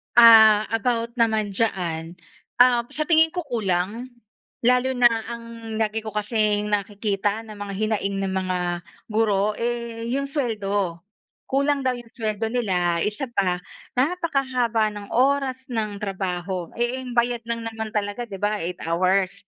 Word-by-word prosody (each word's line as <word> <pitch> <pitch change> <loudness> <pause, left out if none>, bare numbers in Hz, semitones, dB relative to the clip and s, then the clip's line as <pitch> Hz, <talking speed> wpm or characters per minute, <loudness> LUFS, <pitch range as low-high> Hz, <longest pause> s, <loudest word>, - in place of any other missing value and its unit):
Ah, 220 -2 +8
about 230 +1 0
naman 220 -3 +2
diyan. 170 -7 -1 0.5
Ah, 245 -1 +5
sa 305 - -3
tingin 320 +1 +4
ko 355 - -2
kulang, 220 +2 -1 0.5
lalo 250 +2 +3
na 245 -1 +6 0.2
ang 230 -1 -8
lagi 220 0 -1
ko 215 - -5
kasing 210 -1 0
nakikita 205 0 -1
na 215 -2 -11
mga 205 -1 -5
hinaing 200 -1 -1
ng 195 - -1
mga 185 -1 -1 0.5
guro, 210 -1 +1
eh, 235 -1 -3
'yong 275 +1 -1
suweldo. 205 - -1 0.5
Kulang 280 +1 +1
daw 255 -1 0
'yong 240 -1 -13
suweldo 220 -2 -2
nila 180 -8 +1
isa 210 - -1
pa, 195 -7 0 0.4
napakahaba 255 -8 +1
ng 205 -1 -8
oras 270 +1 +2 0.2
ng 215 -3 -2
trabaho, 185 -3 -3
eh, 240 +2 -1
ang 250 -2 -7
bayad 240 0 +2
lang 230 0 -2
naman 225 -1 -4
talaga, 210 +3 -3
'di 195 - -6
ba, 205 +1 -1
8 175 +1 -4
hours. 185 +3 +2
220 Hz, 145 wpm, -24 LUFS, 200-240 Hz, 0.5 s, Ah